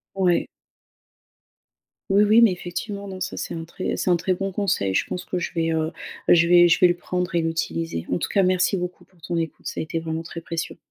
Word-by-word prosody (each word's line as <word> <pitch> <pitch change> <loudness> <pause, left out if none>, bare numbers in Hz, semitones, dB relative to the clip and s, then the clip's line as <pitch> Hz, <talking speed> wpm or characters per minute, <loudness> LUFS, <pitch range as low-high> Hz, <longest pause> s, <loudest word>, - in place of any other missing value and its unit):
Ouais. 180 -3 +2 1.6
Oui, 200 +2 +5
oui 215 +2 +5
,mais 225 -5 +6
effectivement, 200 +3 -5
non, 190 - -7
ça 185 +1 -3
c'est - - -4
un 165 -1 -5
très 185 +3 -4
c'est - - -1
un 175 - +5
très 185 +2 0
bon 195 +1 -3
conseil. 180 - 0
Je - - +2
pense 180 - -5
que 180 - -2
je - - -3
vais, 165 -1 0
heu, 160 0 0 0.3
bah, - - +6
je 170 0 +5
vais 175 0 +7
je 170 - +4
vais 180 - +7
le 175 - +3
prendre 180 0 -3
et 170 - +3
l'utiliser. 165 - -2
En 90 - +1
tout - - -3
cas 195 - +3
merci 185 +2 +2
beaucoup 180 0 -5
pour 185 - -27
ton 170 +2 -4
écoute, 165 -1 -3
ça - - -3
a - - -2
été 165 +1 -3
vraiment 160 0 -4
très 170 - -7
précieux. 165 0 -5
175 Hz, 240 wpm, -23 LUFS, 165-185 Hz, 1.6 s, vais